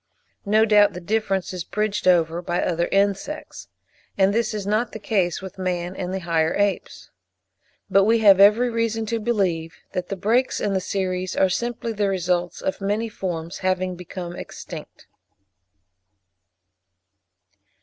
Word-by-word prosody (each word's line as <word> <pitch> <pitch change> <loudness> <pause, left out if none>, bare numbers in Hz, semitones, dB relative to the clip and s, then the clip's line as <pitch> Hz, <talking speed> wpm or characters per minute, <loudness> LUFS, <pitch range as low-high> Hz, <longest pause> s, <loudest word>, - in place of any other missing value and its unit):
No 215 +2 +4
doubt 210 -2 +5
the 180 - -6
difference 195 -1 -1
is 180 -2 -4
bridged 210 -1 -2
over 170 -1 +3
by 175 0 -2
other 170 -1 0
insects; 200 +10 -1 0.5
and 195 0 +3
this 230 +1 +1
is 210 -3 -4
not 215 +4 0
the 220 - -6
case 195 -4 0
with 190 0 -9
man 180 -1 -2
and 180 -1 -4
the 190 0 -3
higher 165 -2 +1
apes. 205 -1 -2 0.8
But 195 0 +4
we 225 +2 +4
have 200 -4 +6
every 215 +5 +6
reason 225 -1 -1
to 230 +1 -2
believe 190 -8 -1 0.2
that 180 - -4
the 195 - -2
breaks 230 +7 +1
in 205 - -1
the 190 - 0
series 185 -1 -2
are 190 - +3
simply 235 +3 -2
the 205 -1 0
results 180 -2 -1
of 190 - -2
many 210 +3 -1
forms 170 -5 -5
having 185 -1 -1
become 175 0 -7
extinct. - - -9
195 Hz, 150 wpm, -23 LUFS, 180-215 Hz, 0.8 s, have